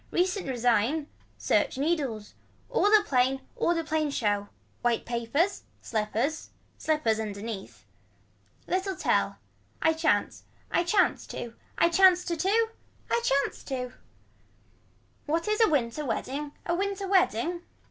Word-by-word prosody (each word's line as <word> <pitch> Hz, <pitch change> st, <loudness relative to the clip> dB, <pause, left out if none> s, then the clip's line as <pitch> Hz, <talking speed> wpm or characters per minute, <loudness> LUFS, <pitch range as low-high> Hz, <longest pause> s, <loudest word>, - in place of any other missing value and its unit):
Recent 365 Hz, +1 st, 0 dB
resign. 245 Hz, +4 st, +2 dB, 0.3 s
Search -, -, +1 dB
needles. 275 Hz, -8 st, -1 dB, 0.4 s
All -, -, +3 dB
a 420 Hz, 0 st, +6 dB
plain 265 Hz, -5 st, +2 dB
all 340 Hz, 0 st, +1 dB
a 330 Hz, -, -1 dB
plain 310 Hz, -1 st, 0 dB
show. 205 Hz, -6 st, 0 dB, 0.3 s
White 240 Hz, -1 st, +1 dB
papers. 240 Hz, -, 0 dB, 0.2 s
Slippers. 225 Hz, +7 st, -2 dB, 0.3 s
Slippers 300 Hz, -9 st, +1 dB
underneath. 210 Hz, -1 st, -6 dB, 0.8 s
Little 380 Hz, +1 st, -1 dB
tell. -, -, +1 dB, 0.4 s
I 320 Hz, -, +3 dB
chance. 315 Hz, -11 st, +1 dB, 0.3 s
I 345 Hz, -, +3 dB
chance 375 Hz, +2 st, +2 dB
to. 235 Hz, -1 st, -6 dB, 0.2 s
I 335 Hz, -, +5 dB
chance 360 Hz, +1 st, +5 dB
to 340 Hz, -, -1 dB
to. 440 Hz, +6 st, +2 dB, 0.4 s
I 470 Hz, -, +2 dB
chance 280 Hz, -, 0 dB
to. 255 Hz, -2 st, -4 dB, 1.3 s
What 330 Hz, +6 st, 0 dB
is 425 Hz, +2 st, +1 dB
a -, -, +5 dB
winter 280 Hz, -1 st, 0 dB
wedding 285 Hz, +3 st, -3 dB
a 340 Hz, -, 0 dB
winter 395 Hz, +2 st, -1 dB
wedding. 355 Hz, -, +2 dB
305 Hz, 125 wpm, -28 LUFS, 235-360 Hz, 1.3 s, a